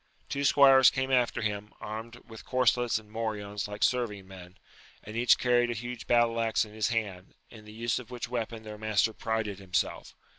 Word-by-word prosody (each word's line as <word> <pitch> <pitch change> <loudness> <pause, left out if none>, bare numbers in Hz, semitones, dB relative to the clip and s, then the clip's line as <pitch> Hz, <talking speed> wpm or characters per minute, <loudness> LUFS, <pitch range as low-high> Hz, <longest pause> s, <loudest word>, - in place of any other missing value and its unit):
Two 140 - -2
squires 135 -2 +7
came 130 0 -2
after 120 -2 +1
him, 105 0 -3
armed 110 +2 -7
with 115 -1 -11
corselets 125 -2 +2
and 105 -1 -11
morions 105 -2 -4
like 105 +1 -4
serving 105 -6 0
men, 90 -1 -13 0.5
and 110 - -9
each 120 +1 +4
carried 120 -1 +2
a 120 - -2
huge 120 +1 -7
battle 120 -1 +3
axe 110 -1 +1
igi 105 - -14
his 110 -1 0
hand, 100 -6 -3 0.2
in 110 -2 -13
the 105 - -12
use 115 +2 -2
of 125 - -11
which 125 -1 -5
weapon 115 -2 -4
their 105 -1 -9
master 110 0 +1
prided 110 -3 -3
himself. 90 -2 -3
110 Hz, 190 wpm, -29 LUFS, 105-120 Hz, 0.5 s, squires